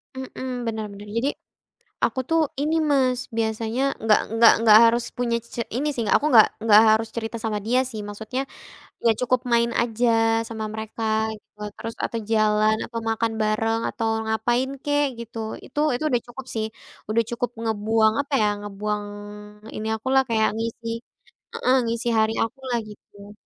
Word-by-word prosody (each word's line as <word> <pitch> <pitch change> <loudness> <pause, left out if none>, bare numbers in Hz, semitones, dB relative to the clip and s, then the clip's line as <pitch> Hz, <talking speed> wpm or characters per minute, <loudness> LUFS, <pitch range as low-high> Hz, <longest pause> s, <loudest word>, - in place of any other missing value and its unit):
Mhm, 255 -2 -5
bener 220 -1 -2
bener 205 +1 -11
jadi, 270 +5 +1 0.8
aku 260 - 0
tuh 325 0 +3 0.2
ini 310 +2 +1 0.2
Mas, 255 -3 +2 0.2
biasanya 225 +2 -1 0.2
nggak 215 -1 +5 0.2
nggak 230 0 +8
nggak 215 -2 +8
harus 235 +1 +3
punya 240 -1 0 0.2
c - - -8 0.2
ini 295 +3 0
sih 230 - -1
aku 300 - 0
gak 220 - +9 0.2
gak 210 +1 +9
harus 220 +1 +2
cerita 225 0 -3
sama 215 -2 -1
dia 250 +2 +3
sih 220 - -6
maksudnya, 220 +5 -4 0.7
ya 230 - +6
cukup 250 +1 +2
main 235 0 +3
aja 235 +1 0 0.4
sama 220 -1 -4
mereka 220 +1 -6 0.3
gitu - - -29
loh 210 0 -4
terus 230 - -5
atau 230 - -2
jalan 215 0 +3
atau 230 -1 -5
makan 225 0 0
bareng 225 +1 +1
atau 225 -1 -2 0.2
ngapain 240 +4 0
kek 290 0 +2
gitu. 230 0 -8 0.3
Itu 295 - -5
itu 245 - -2
udah 245 -3 +1
cukup 255 +2 -9
sih, 220 -1 0 0.4
udah 230 +1 +2
cukup 240 0 -2
ngebuang 220 0 +2
apa 285 0 -9
ya, 210 - +3
ngebuang 205 +1 -3 0.7
ini 215 +1 -4
akulah 260 +4 +2
kayak 220 -1 +3
ngisi 230 0 -4 0.7
heeh, 255 - +2
ngisi 230 +1 -2
hari 220 0 +3
akulah 250 +1 -2
gitu. 205 0 -14
230 Hz, 165 wpm, -24 LUFS, 220-245 Hz, 0.8 s, gak